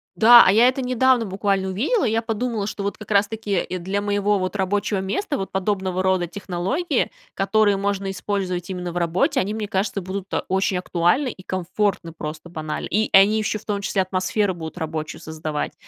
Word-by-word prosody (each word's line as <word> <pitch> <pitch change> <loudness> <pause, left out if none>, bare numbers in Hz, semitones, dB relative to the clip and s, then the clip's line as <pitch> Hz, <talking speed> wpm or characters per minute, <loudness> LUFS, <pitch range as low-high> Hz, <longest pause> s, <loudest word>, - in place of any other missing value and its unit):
Да, 235 +2 +9
а 185 - +6
я 230 +5 +6
это 260 +1 0
недавно 255 -1 +2
буквально 195 -1 -1
увидела. 265 - 0
Я 225 -1 +1
подумала, 225 -2 -2
что 210 -2 -5
вот 200 - -3
как 215 0 -10
раз 200 0 +4
таки 210 -4 -2
для 190 +3 -2
моего, 205 0 +1
вот, 185 +2 -3
рабочего 200 +1 0
места, 285 - -2
вот 195 - -5
подобного 190 -1 -1
рода 185 -2 +1
технологии, 190 - -2 0.2
которые 205 0 +2
можно 200 -1 -1
использовать 185 -2 -3
именно 180 -2 -4
в 175 - -5
работе, 170 +1 +1
они, 200 +3 -1
мне 215 -1 -3
кажется, 195 +1 -1
будут, 190 +1 -6
а, - - 0
очень 190 0 +1
актуальны 180 +9 +1
и 185 - -13
комфортны 185 -1 -2
просто 155 +1 -7
банально. 155 -2 -4
И 215 +4 0
они 200 +3 +6
еще, 215 0 -1
в 215 - -15
том 205 -1 -1
числе, 195 0 0
атмосферу 185 +2 0
будут 160 0 -8
рабочую 155 -1 -4
создавать. 155 -1 -4
195 Hz, 190 wpm, -22 LUFS, 185-215 Hz, 0.2 s, Да